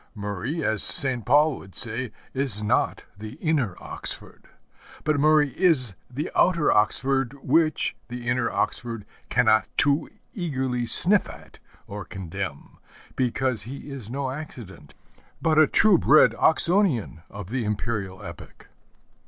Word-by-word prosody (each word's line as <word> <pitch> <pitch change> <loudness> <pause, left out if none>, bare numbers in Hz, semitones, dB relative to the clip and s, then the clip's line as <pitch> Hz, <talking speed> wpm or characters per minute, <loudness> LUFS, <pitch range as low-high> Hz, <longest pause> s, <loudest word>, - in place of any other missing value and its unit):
Murray, 105 - -4
as 110 -4 0
St. 130 -4 +3
Paul 145 +4 +3
would 95 -1 -15
say, 120 0 -3 0.2
is 130 -6 0
not 105 - 0
the 110 +1 -8
inner 140 - -1
Oxford; - - -4 0.6
but 150 -2 0
Murray 150 0 +4
is 135 - +3 0.2
the 140 +6 -5
outer 170 -4 +3
Oxford 135 +4 +2
which 155 +3 +2
the 120 0 -8
inner 125 -1 0
Oxford 115 -3 -3 0.2
cannot 110 0 +3
too 145 +1 +3 0.2
eagerly 130 - -2
sniff 200 - +3
at - - -14 0.3
or 105 0 -7
condemn; 95 -6 -7 0.4
because 130 -2 -1
he 135 +6 -9
is 130 -6 -8
no 135 +1 -3
accident, 120 - -10 0.4
but 160 -1 +2
a 155 - +6
true 205 0 +5
bred 155 +2 +5
Oxonian 160 - +1
of 100 0 -9
the 125 -1 -1
Imperial 105 -2 -4
epoch. 85 -2 -12
130 Hz, 130 wpm, -24 LUFS, 105-150 Hz, 0.6 s, a